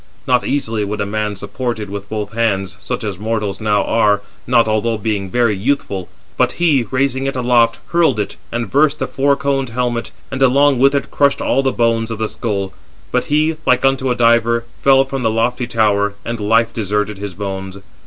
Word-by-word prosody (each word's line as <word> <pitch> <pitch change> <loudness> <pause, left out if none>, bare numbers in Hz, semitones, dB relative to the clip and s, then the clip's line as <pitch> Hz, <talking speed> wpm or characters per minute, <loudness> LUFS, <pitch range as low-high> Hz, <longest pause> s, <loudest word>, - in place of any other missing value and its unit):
Not 125 -1 +2
easily 115 -6 -1
would 105 +1 -4
a - - 0
man 105 0 -2
support 115 +5 -4
it 105 -1 -6
with 100 0 -7
both 105 -1 -4
hands, 100 -6 0
such 125 +2 -4
as 100 -4 -4
mortals 105 -2 -2
now 105 -1 +2
are, 105 -3 +2 0.2
not 120 -2 +4
although 110 +1 0
being 100 -2 -2
very 120 -1 +2
youthful; 100 -4 -2 0.3
but - - +2
he, 150 -8 +2
raising 135 0 0
it 135 - -2
aloft, 120 -2 +3
hurled 165 -9 +2
it, 105 - -3 0.2
and 120 -3 -3
burst 150 +1 +3
the - - -2
four 140 +1 +1
coned 135 -2 -1
helmet, 120 0 -2 0.2
and 135 0 -4
along 135 +1 +4
with 140 +2 +4
it 140 - -2
crushed 140 -1 +2
all 135 - +1
the 135 -1 +1
bones 115 -2 +1
of 115 - -4
the 110 0 -1
skull: 100 -4 -3 0.4
but - - +1
he, 155 +2 +1
like 125 +1 +3
unto 135 -1 +2
a 125 - +1
diver, 115 0 +3
fell 135 0 +4
from 135 -1 -4
the 115 - +2
lofty 120 +2 0
tower, 105 -3 +1
and 115 -1 -3
life 115 +2 +2
deserted 105 -1 -2
his 100 -3 -6
bones. 95 -1 -5
115 Hz, 200 wpm, -17 LUFS, 105-130 Hz, 0.4 s, not